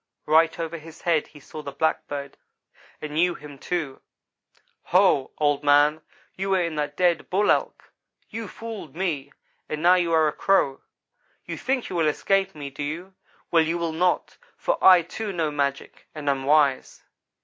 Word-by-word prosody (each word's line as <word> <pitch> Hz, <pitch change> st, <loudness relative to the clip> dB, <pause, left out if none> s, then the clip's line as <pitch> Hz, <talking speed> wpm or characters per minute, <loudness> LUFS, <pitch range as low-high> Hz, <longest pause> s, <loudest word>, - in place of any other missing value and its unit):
Right 160 Hz, +2 st, +4 dB
over 165 Hz, 0 st, -4 dB
his 160 Hz, +1 st, -14 dB
head 165 Hz, -3 st, +1 dB
he 150 Hz, -, -15 dB
saw 155 Hz, +2 st, -9 dB
the 140 Hz, -, -7 dB
black 160 Hz, +3 st, -1 dB
bird 140 Hz, -1 st, -6 dB, 0.7 s
and 150 Hz, -1 st, -5 dB
knew 175 Hz, +3 st, +2 dB
him, 145 Hz, -2 st, -12 dB
too. 155 Hz, -6 st, -3 dB, 0.8 s
"'Ho! 180 Hz, -7 st, +3 dB
Old 145 Hz, -2 st, +1 dB
man, 145 Hz, +2 st, +4 dB, 0.3 s
you 195 Hz, +1 st, -3 dB
were 190 Hz, -1 st, +3 dB
in 170 Hz, -1 st, -3 dB
that 150 Hz, 0 st, -3 dB
dead 175 Hz, -2 st, +1 dB
Bull 200 Hz, +3 st, +3 dB
Elk. -, -, -2 dB, 0.3 s
You 225 Hz, -1 st, -6 dB
fooled 215 Hz, -10 st, -8 dB
me, 155 Hz, -7 st, -2 dB, 0.4 s
and 155 Hz, +1 st, -4 dB
now 175 Hz, +1 st, +7 dB
you 175 Hz, -2 st, +1 dB
are 160 Hz, -1 st, +4 dB
a 150 Hz, -, -1 dB
Crow. 140 Hz, -9 st, +1 dB, 0.6 s
You -, -, -5 dB
think 265 Hz, -2 st, -2 dB
you 185 Hz, -, -5 dB
will 165 Hz, -2 st, +2 dB
escape 195 Hz, +5 st, +1 dB
me, 145 Hz, -2 st, -7 dB
do 140 Hz, -, -8 dB
you? 165 Hz, +6 st, -5 dB, 0.4 s
Well, 165 Hz, -, +5 dB
you 165 Hz, +2 st, 0 dB
will 170 Hz, -1 st, -2 dB
not; 180 Hz, +2 st, 0 dB, 0.2 s
for -, -, -1 dB
I, 180 Hz, -2 st, +8 dB
too, 210 Hz, +5 st, -5 dB
know 165 Hz, -4 st, -1 dB
magic, 140 Hz, -1 st, -3 dB
and 150 Hz, -2 st, -7 dB
am 135 Hz, -1 st, 0 dB
wise.' 145 Hz, -2 st, +2 dB
160 Hz, 180 wpm, -24 LUFS, 145-180 Hz, 0.8 s, I